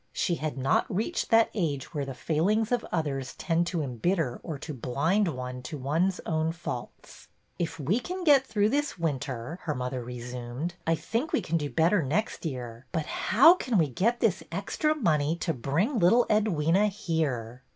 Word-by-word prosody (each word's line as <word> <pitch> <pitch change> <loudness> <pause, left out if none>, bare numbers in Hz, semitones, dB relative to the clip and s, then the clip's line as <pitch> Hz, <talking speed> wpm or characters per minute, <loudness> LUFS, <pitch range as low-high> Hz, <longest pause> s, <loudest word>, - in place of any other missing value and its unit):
She 175 - 0
had 155 -3 -3
not 135 +1 +1
reached 220 - -1
that 225 -1 +5
age 155 - -2
where 145 -3 -2
the 135 -1 -6
failings 200 - +1
of 245 -1 +1
others 140 -5 -2
tend 170 0 0
to 170 -4 -1
embitter 135 - -1
or 160 -4 -5
to 150 +2 -7
blind 145 - +1
one 125 -4 -4
to 135 +4 -6
one's 165 +8 0
own 160 0 0
faults. 165 -8 -8 0.3
If 170 -2 -2
we 165 - +1
can 365 +7 -5
get 285 -5 +6
through 215 -4 +1
this 290 -1 -1
winter," 140 -1 -3
her 150 - -2
mother 125 0 -3
resumed, 125 +5 -5
I 165 - +4
think 235 - -2
we - - +2
can 165 - -2
do 145 -2 -2
better 165 +5 +3
next 165 +8 -1
year. 125 -3 -7
But 160 -2 -1
how 265 - +6
can 255 - -1
we 160 -5 +3
get 230 - 0
this 190 -5 +2
extra 205 - 0
money 160 - +1
to 170 -1 -2
bring 165 - 0
little 230 +8 +5
Edwyna 205 -2 +3
here?" 140 - -2
165 Hz, 180 wpm, -28 LUFS, 135-205 Hz, 0.3 s, get